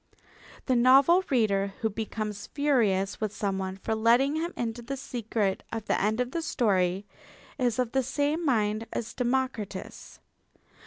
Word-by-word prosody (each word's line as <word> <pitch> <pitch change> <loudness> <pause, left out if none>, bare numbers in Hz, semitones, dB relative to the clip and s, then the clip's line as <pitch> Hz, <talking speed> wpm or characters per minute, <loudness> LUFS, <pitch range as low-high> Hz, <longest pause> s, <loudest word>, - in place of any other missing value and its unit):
The 260 - +2
novel 270 +9 +6
reader 200 -6 +1
who 225 - +2
becomes 215 -1 -4
furious 220 -11 +1
with 215 -2 -1
someone 190 -2 -3
for 210 - -3
letting 240 +6 +3
him 335 +2 -2
into 235 0 -3
the 270 +4 -5
secret 225 -6 -2
of 225 -2 -4
the - - 0
end 215 +3 +1
of 250 0 -1
the 335 - -2
story 195 - +1 0.5
is 245 -3 +1
of 250 -2 0
the 265 - +2
same 290 +5 -1
mind 220 -5 +1
as 230 - -4
Democritus. 245 -6 -3
230 Hz, 150 wpm, -28 LUFS, 210-265 Hz, 0.5 s, novel